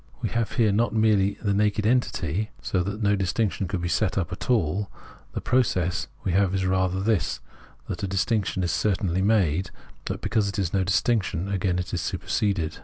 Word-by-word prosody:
We -, -, -2 dB
have 115 Hz, -2 st, -1 dB
here 115 Hz, -4 st, +3 dB
not 110 Hz, +1 st, +1 dB
merely 105 Hz, -3 st, +3 dB
the 100 Hz, -2 st, +1 dB
naked 105 Hz, +1 st, +1 dB
unity, 110 Hz, -4 st, 0 dB
so 95 Hz, -, -1 dB
that 100 Hz, +4 st, -3 dB
no 100 Hz, 0 st, +3 dB
distinction 95 Hz, +1 st, -1 dB
could 90 Hz, +1 st, -3 dB
be -, -, 0 dB
set 95 Hz, +3 st, 0 dB
up 90 Hz, -3 st, -1 dB
at 95 Hz, -, -6 dB
all; 100 Hz, -3 st, +1 dB, 0.4 s
the -, -, -3 dB
process 95 Hz, -9 st, +1 dB, 0.2 s
we 95 Hz, -, 0 dB
have 95 Hz, +1 st, +2 dB
is 95 Hz, -1 st, 0 dB
rather 95 Hz, 0 st, +1 dB
this, 105 Hz, -2 st, 0 dB, 0.5 s
that -, -, -4 dB
a 100 Hz, -, -1 dB
distinction 95 Hz, 0 st, 0 dB
is 85 Hz, -, 0 dB
certainly 95 Hz, -2 st, 0 dB
made, 95 Hz, -5 st, +2 dB, 0.4 s
but -, -, -3 dB
because 105 Hz, -2 st, +1 dB
it 100 Hz, -, -5 dB
is 95 Hz, -4 st, -1 dB
no 95 Hz, -1 st, +2 dB
distinction, 100 Hz, -1 st, +1 dB
it -, -, -5 dB
is -, -, -2 dB
again 90 Hz, -2 st, 0 dB
superseded. 90 Hz, -1 st, -1 dB
100 Hz, 190 wpm, -25 LUFS, 90-105 Hz, 0.5 s, here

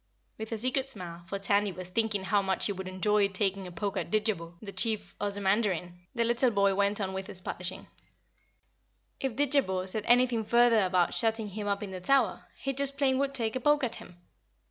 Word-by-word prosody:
With 220 Hz, +1 st, -6 dB
a 225 Hz, -, -2 dB
secret 255 Hz, +4 st, 0 dB
smile, 175 Hz, -7 st, -7 dB
for 200 Hz, -, -3 dB
Tandy 200 Hz, +1 st, +1 dB
was 185 Hz, 0 st, -9 dB
thinking 215 Hz, -1 st, 0 dB
how 205 Hz, +1 st, +2 dB
much 190 Hz, -1 st, -1 dB
he -, -, +1 dB
would 190 Hz, -1 st, -6 dB
enjoy 200 Hz, +2 st, +2 dB
taking 195 Hz, -1 st, -1 dB
a -, -, -9 dB
poke 200 Hz, +3 st, -3 dB
at -, -, -3 dB
Didjabo, 205 Hz, -6 st, -1 dB
the 205 Hz, -2 st, -8 dB
Chief 215 Hz, +3 st, +2 dB
Ozamandarin, 200 Hz, -3 st, 0 dB, 0.2 s
the 235 Hz, -, +2 dB
little 240 Hz, +2 st, +2 dB
boy 200 Hz, -3 st, +2 dB
went 200 Hz, +1 st, +1 dB
on 190 Hz, -2 st, -2 dB
with 190 Hz, 0 st, -4 dB
his 185 Hz, -, -3 dB
polishing. 180 Hz, 0 st, -6 dB, 1.3 s
If 270 Hz, -3 st, -2 dB
Didjabo 260 Hz, -10 st, +1 dB
said 210 Hz, +3 st, -1 dB
anything 240 Hz, -2 st, +4 dB
further 235 Hz, +1 st, +4 dB
about 180 Hz, -1 st, +1 dB
shutting 225 Hz, -2 st, +1 dB
him 205 Hz, +1 st, -5 dB
up 200 Hz, 0 st, -1 dB
in 200 Hz, -, -6 dB
the 185 Hz, -1 st, -6 dB
Tower, 255 Hz, 0 st, +1 dB
he 275 Hz, -, -3 dB
just 275 Hz, +1 st, +3 dB
plain 265 Hz, -2 st, +2 dB
would 275 Hz, 0 st, -1 dB
take 225 Hz, -3 st, -1 dB
a -, -, 0 dB
poke 295 Hz, +2 st, +3 dB
at 235 Hz, -2 st, -1 dB
him. 175 Hz, -, -13 dB
205 Hz, 205 wpm, -29 LUFS, 190-235 Hz, 1.3 s, anything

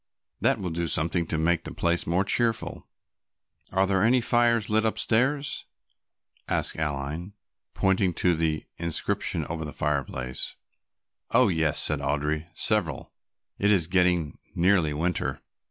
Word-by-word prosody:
That -, -, +2 dB
will 90 Hz, -3 st, -4 dB
do 85 Hz, +1 st, -2 dB
something 85 Hz, +2 st, 0 dB
to 80 Hz, -, -2 dB
make 85 Hz, +1 st, +1 dB
the -, -, -7 dB
place 85 Hz, 0 st, 0 dB
more 90 Hz, +3 st, +2 dB
cheerful." 115 Hz, +1 st, -1 dB, 0.8 s
"Are 95 Hz, +1 st, +2 dB
there 95 Hz, -1 st, +1 dB
any 120 Hz, +4 st, +4 dB
fires 120 Hz, -2 st, +2 dB
lit 110 Hz, +1 st, +2 dB
upstairs?" 130 Hz, +6 st, 0 dB, 0.8 s
asked -, -, +2 dB
Aline, 75 Hz, +5 st, -3 dB, 0.4 s
pointing 95 Hz, -2 st, +1 dB
to 90 Hz, -, +2 dB
the 80 Hz, -1 st, -1 dB
inscription 85 Hz, -1 st, -1 dB
over 80 Hz, -1 st, -4 dB
the 75 Hz, -, -6 dB
fireplace. 65 Hz, -4 st, -2 dB, 0.7 s
"Oh, -, -, +4 dB
yes," 80 Hz, -4 st, +1 dB
said 75 Hz, -2 st, +5 dB
Audry, 75 Hz, +3 st, -2 dB
"several, -, -, +1 dB, 0.5 s
it 100 Hz, -, +2 dB
is 95 Hz, -6 st, +4 dB
getting 90 Hz, -4 st, +1 dB, 0.2 s
nearly 90 Hz, -3 st, +3 dB
winter." 75 Hz, -4 st, -2 dB
85 Hz, 135 wpm, -26 LUFS, 75-95 Hz, 0.8 s, said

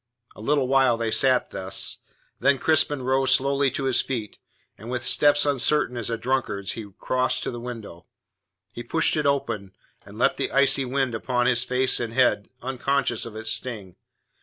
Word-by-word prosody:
A -, -, -12 dB
little 140 Hz, +2 st, +1 dB
while 135 Hz, -2 st, +3 dB
they 115 Hz, -1 st, -2 dB
sat 130 Hz, +1 st, +2 dB
thus, 95 Hz, 0 st, -1 dB, 0.4 s
then 135 Hz, +2 st, +3 dB
Crispin 145 Hz, -2 st, +1 dB
rose 130 Hz, +1 st, +3 dB
slowly 140 Hz, +1 st, +1 dB
to 135 Hz, -, -4 dB
his 130 Hz, -2 st, +1 dB
feet, 115 Hz, -6 st, -5 dB, 0.4 s
and 110 Hz, -, -11 dB
with 125 Hz, -1 st, -3 dB
steps 145 Hz, +3 st, +3 dB
uncertain 140 Hz, -1 st, +1 dB
as 120 Hz, -2 st, -3 dB
a 115 Hz, -, -2 dB
drunkard's 115 Hz, -5 st, -2 dB
he 110 Hz, -2 st, -7 dB
crossed 130 Hz, 0 st, 0 dB
to -, -, -3 dB
the 120 Hz, -, -7 dB
window. 115 Hz, -8 st, -9 dB, 0.7 s
He 120 Hz, -, -7 dB
pushed 160 Hz, +9 st, +1 dB
it 150 Hz, -2 st, 0 dB
open, 115 Hz, -9 st, -2 dB, 0.3 s
and -, -, -14 dB
let -, -, +2 dB
the -, -, -2 dB
icy 135 Hz, 0 st, +4 dB
wind 130 Hz, -1 st, -1 dB
upon 125 Hz, +2 st, -1 dB
his 125 Hz, -1 st, +2 dB
face 130 Hz, +1 st, +1 dB
and 115 Hz, -1 st, -4 dB
head, 125 Hz, -5 st, +2 dB
unconscious 130 Hz, -2 st, -1 dB
of 110 Hz, -, -11 dB
its 110 Hz, 0 st, -3 dB
sting. 105 Hz, -8 st, -5 dB
125 Hz, 180 wpm, -24 LUFS, 115-135 Hz, 0.7 s, icy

